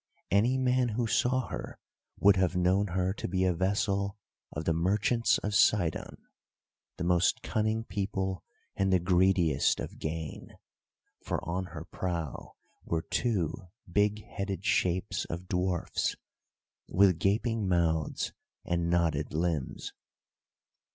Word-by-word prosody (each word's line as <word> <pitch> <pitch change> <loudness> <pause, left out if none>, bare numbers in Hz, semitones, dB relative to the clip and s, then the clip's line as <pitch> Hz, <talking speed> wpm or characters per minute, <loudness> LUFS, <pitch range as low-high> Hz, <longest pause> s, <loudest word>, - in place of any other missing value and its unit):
Any 115 +7 +3
man 130 -1 +2
who 115 +2 -1
saw 125 +3 +1
her - - -6 0.4
would 100 0 +6
have 95 -1 +1
known 90 +3 +2
her 90 +1 0
to - - -5
be 95 +1 0
a 90 -1 +3
vessel 100 +2 0 0.3
of 80 +1 -5
the 85 - +2
merchants 105 +8 +2
of 105 - -3
Sidon—the 90 -2 -1
most 90 +1 +2
cunning 110 +1 0
people 95 -3 -3 0.3
and 95 0 +1
the 95 - +6
greediest 90 -2 +3
of - - -6
gain—for 80 0 -7
on 90 +2 -1
her 80 -2 -8
prow 85 -5 -4 0.3
were 80 -1 -1
two 95 -4 -1 0.2
big 105 +3 +1
headed 100 -1 -4
shapes 90 -1 +1
of 85 +2 -6
dwarfs, 90 -1 -1 0.7
with 95 -3 +4
gaping 110 +3 +1
mouths 80 -4 0 0.3
and 85 -1 0
knotted 80 -4 +1
limbs. 80 -5 -2
95 Hz, 120 wpm, -30 LUFS, 85-100 Hz, 0.7 s, would